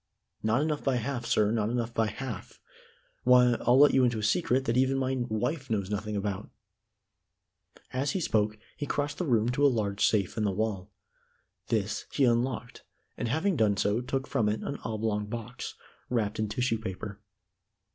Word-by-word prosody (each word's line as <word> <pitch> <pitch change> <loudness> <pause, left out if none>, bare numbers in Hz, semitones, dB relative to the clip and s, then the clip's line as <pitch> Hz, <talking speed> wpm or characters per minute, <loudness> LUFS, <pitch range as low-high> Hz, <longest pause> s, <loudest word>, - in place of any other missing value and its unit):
"Not 110 +6 +2
enough 155 -2 -1
by 135 -2 +2
half, 120 0 -2
sir 105 -1 +3
not 110 -2 +1
enough 120 -1 -2
by 115 -1 +2
half. 110 -1 -6 0.6
Why, 125 -1 +6
I'll 120 +2 +4
let 145 +1 +7
you 130 - +5
into 120 -2 +2
a 105 - -3
secret 130 +3 +2
that 115 - +1
even 130 +1 +3
my 130 0 0
wife 130 +6 -2
knows 100 -3 -1
nothing 105 +1 -2
about." 100 -1 -3 1.4
As 140 +2 0
he - - 0
spoke, 110 -8 +1 0.2
he 145 - -4
crossed 145 0 -2
the 180 - -1
room 115 -3 +3
to 125 +4 0
a - - +8
large 105 -6 0
safe 100 -1 +2
in 110 - +1
the 105 - +2
wall. 100 -1 -2 0.8
This 105 -2 -1
he 140 - +1
unlocked 120 0 0 0.3
and - - -3
having 160 - +1
done 105 -6 +2
so 105 +5 +1
took 130 +1 -2
from 105 -3 +1
it 105 - -1
an 140 - -4
oblong 110 -2 -1
box, 120 +2 -6 0.3
wrapped 110 -4 -1
in 110 -1 0
tissue 115 +1 0
paper. 100 0 -6
115 Hz, 180 wpm, -29 LUFS, 105-130 Hz, 1.4 s, a